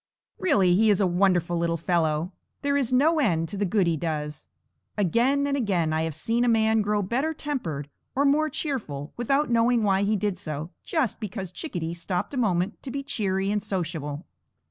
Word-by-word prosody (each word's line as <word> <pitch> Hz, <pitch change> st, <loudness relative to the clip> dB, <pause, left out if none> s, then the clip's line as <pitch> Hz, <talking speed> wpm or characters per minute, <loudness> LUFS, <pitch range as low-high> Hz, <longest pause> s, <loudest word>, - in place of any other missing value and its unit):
Really, 190 Hz, -, +3 dB
he 215 Hz, +4 st, +4 dB
is 205 Hz, -, +4 dB
a 200 Hz, -, +3 dB
wonderful 175 Hz, -1 st, +2 dB
little 170 Hz, 0 st, 0 dB
fellow; 165 Hz, 0 st, 0 dB, 0.3 s
there 280 Hz, 0 st, +1 dB
is 270 Hz, -4 st, +1 dB
no 305 Hz, +6 st, +4 dB
end 165 Hz, -, +1 dB
to -, -, -6 dB
the 205 Hz, -, +1 dB
good 195 Hz, +1 st, +2 dB
he 170 Hz, -1 st, +2 dB
does. 150 Hz, -2 st, -4 dB, 0.5 s
Again 240 Hz, -, +2 dB
and 280 Hz, 0 st, 0 dB
again 185 Hz, -, 0 dB
I 160 Hz, -, +1 dB
have 160 Hz, -2 st, -2 dB
seen 230 Hz, +9 st, 0 dB
a -, -, +2 dB
man 220 Hz, -1 st, +3 dB
grow 210 Hz, 0 st, 0 dB
better 265 Hz, +11 st, -1 dB
tempered 170 Hz, -, -3 dB, 0.3 s
or 280 Hz, +2 st, +2 dB
more 305 Hz, +2 st, +3 dB
cheerful, 205 Hz, -, -4 dB
without 275 Hz, +3 st, +1 dB
knowing 235 Hz, 0 st, +3 dB
why 195 Hz, -2 st, +3 dB
he 205 Hz, +2 st, +2 dB
did 200 Hz, -2 st, -1 dB
so, 155 Hz, -2 st, -5 dB
just 290 Hz, -, -1 dB
because 195 Hz, -4 st, -5 dB
Chickadee 175 Hz, -, -4 dB
stopped 180 Hz, -, -3 dB
a -, -, -3 dB
moment 190 Hz, -5 st, 0 dB
to 270 Hz, -, -7 dB
be 275 Hz, +2 st, -4 dB
cheery 195 Hz, -7 st, -1 dB
and 210 Hz, 0 st, 0 dB
sociable. 165 Hz, -6 st, -3 dB
200 Hz, 190 wpm, -26 LUFS, 170-245 Hz, 0.5 s, he